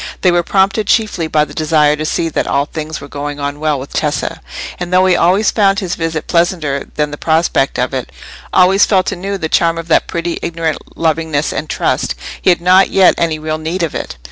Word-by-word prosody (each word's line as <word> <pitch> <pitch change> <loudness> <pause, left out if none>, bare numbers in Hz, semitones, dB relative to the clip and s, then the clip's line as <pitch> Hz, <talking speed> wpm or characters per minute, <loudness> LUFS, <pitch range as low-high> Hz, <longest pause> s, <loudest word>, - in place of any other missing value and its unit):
They 180 - +4
were 175 0 +3
prompted 195 +4 +1
chiefly 210 -8 +1
by 150 -1 +2
the 145 - -12
desire 150 -1 +2
to 155 +1 -4
see 165 - 0
that - - -2
all 140 - +1
things 155 0 -6
were 140 - -10
going 145 +1 -5
on 145 0 -4
well 150 -2 0
with 135 - -9
Tessa; 160 +2 -2 0.4
and 175 0 -4
though 185 +1 +4
he 185 -1 +4
always 185 +6 +3
found 200 -2 +2
his 185 -3 -3
visit 165 -1 -3
pleasanter 170 -5 0
than 150 -1 -1
the 150 - -7
prospect 160 -4 +1
of 125 +2 -1
it—always 185 +8 0
felt 190 -2 +2
anew 195 +1 -4
the 160 - -3
charm 165 +1 +2
of 165 0 -6
that - - +3
pretty 170 0 -3
ignorant 165 -2 -4
lovingness 160 -2 0
and - - -4
trust—he - - -2
had 175 - +3
not 185 +2 +5
yet 190 -2 +5
any 165 -2 0
real 155 0 -3
need 165 +3 -3
of 160 - -2
it. - - -5
165 Hz, 210 wpm, -15 LUFS, 150-180 Hz, 0.4 s, not